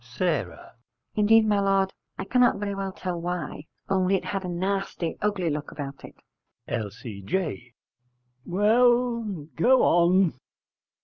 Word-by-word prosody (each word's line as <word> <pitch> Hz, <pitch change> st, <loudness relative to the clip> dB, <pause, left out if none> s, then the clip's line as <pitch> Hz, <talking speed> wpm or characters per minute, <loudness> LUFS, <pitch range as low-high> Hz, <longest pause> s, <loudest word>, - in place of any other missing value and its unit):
S. 155 Hz, -, +1 dB, 0.7 s
Indeed, 220 Hz, +1 st, +5 dB
my 210 Hz, -1 st, +2 dB
lord, 195 Hz, -1 st, +2 dB, 0.2 s
I -, -, -3 dB
cannot 250 Hz, +3 st, +3 dB
very 200 Hz, 0 st, -3 dB
well 195 Hz, -1 st, -3 dB
tell 180 Hz, -2 st, -4 dB
why: 170 Hz, -3 st, -4 dB, 0.2 s
only 190 Hz, 0 st, +2 dB
it 190 Hz, -, -2 dB
had 195 Hz, -1 st, -3 dB
a 180 Hz, -, -4 dB
nasty 185 Hz, -1 st, -2 dB
ugly 200 Hz, -5 st, 0 dB
look 150 Hz, 0 st, -4 dB
about 140 Hz, -2 st, -7 dB
it. -, -, -11 dB, 0.5 s
L.C.J. 115 Hz, -, -4 dB, 0.7 s
Well, 230 Hz, -, +2 dB
go 255 Hz, +10 st, +4 dB
on. 175 Hz, +1 st, +4 dB
190 Hz, 125 wpm, -26 LUFS, 165-205 Hz, 0.7 s, Indeed